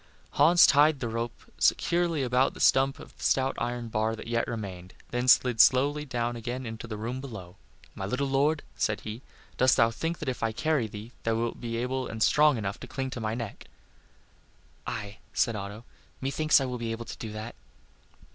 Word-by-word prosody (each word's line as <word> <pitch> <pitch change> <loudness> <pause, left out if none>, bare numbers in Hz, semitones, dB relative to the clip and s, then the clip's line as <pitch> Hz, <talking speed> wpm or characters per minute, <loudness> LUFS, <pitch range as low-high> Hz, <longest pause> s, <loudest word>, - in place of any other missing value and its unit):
Hans 165 +5 +6
tied 145 0 +5
the 120 - -2
rope 115 +1 -4 0.2
securely 170 -4 +2
about 125 +1 +2
the - - -10
stump 135 +1 +4
of - - -13
the - - -18
stout 135 0 +2
iron 120 0 -3
bar 110 0 0
that - - -9
yet 115 0 0
remained, 95 -6 -6 0.2
and 125 +1 -1
then 125 -1 +5
slid 145 +4 +4
down 120 -1 -1
again 120 +2 -5
into 115 0 -6
the 110 -2 -5
room 120 +4 -4
below. 100 -9 -9 0.4
"My 95 - -5
little 130 +6 -1
lord," 145 +3 +1
said 110 - -1
he, 110 +3 -7 0.4
"dost 130 0 +4
thou 115 0 +4
think 165 +8 -3
that - - -7
if 130 -2 -3
I 115 -1 0
carry 130 0 0
thee, 105 +2 -9
thou 115 0 0
wilt 115 0 -2
be 115 -1 -3
able 130 +2 -2
and 110 0 -1
strong 150 -3 +4
enough 100 -2 -4
to - - -9
cling 135 -1 -4
to 125 - -5
my 110 0 -1
neck?" 115 -4 -6 1.2
"Aye," 110 -3 -5 0.2
said 115 -3 +2
Otto, 100 +3 -7 0.3
"methinks 150 +4 +3
I 135 - -1
will 125 -1 -4
be 115 -1 -3
able 115 +1 -6
to - - -8
do 110 - -6
that." 110 +2 -6
120 Hz, 200 wpm, -28 LUFS, 110-135 Hz, 1.2 s, Hans